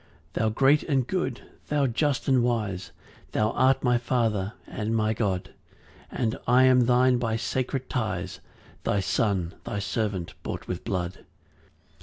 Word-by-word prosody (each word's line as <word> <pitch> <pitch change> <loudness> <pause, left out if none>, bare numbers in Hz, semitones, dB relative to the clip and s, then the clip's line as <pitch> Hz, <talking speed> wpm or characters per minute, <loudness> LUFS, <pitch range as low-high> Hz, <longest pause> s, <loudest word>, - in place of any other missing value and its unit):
2 - - -2
Thou 110 - +2
great 135 +6 +4
and 135 -5 +1
good, 155 -7 -2 0.3
thou 145 -2 +2
just 135 +3 0
and 130 -2 +4
wise, 105 -7 -1 0.4
Thou 110 +1 +2
art 130 +2 +3
my 125 -2 +3
Father 110 -5 0
and 110 +1 -3
my 110 0 +2
God; 100 -5 -1 0.6
And 115 -3 -1
I 125 +2 +6
am 125 -2 +5
thine 125 0 +4
by 115 -2 0
sacred 130 +3 -2
ties; 95 -6 -3 0.4
Thy 100 - +1
son, 95 -3 0
thy - - -4
servant 100 -2 -2
bought - - -5
with 90 - -4
blood. 90 -1 -3
115 Hz, 150 wpm, -26 LUFS, 100-130 Hz, 0.6 s, I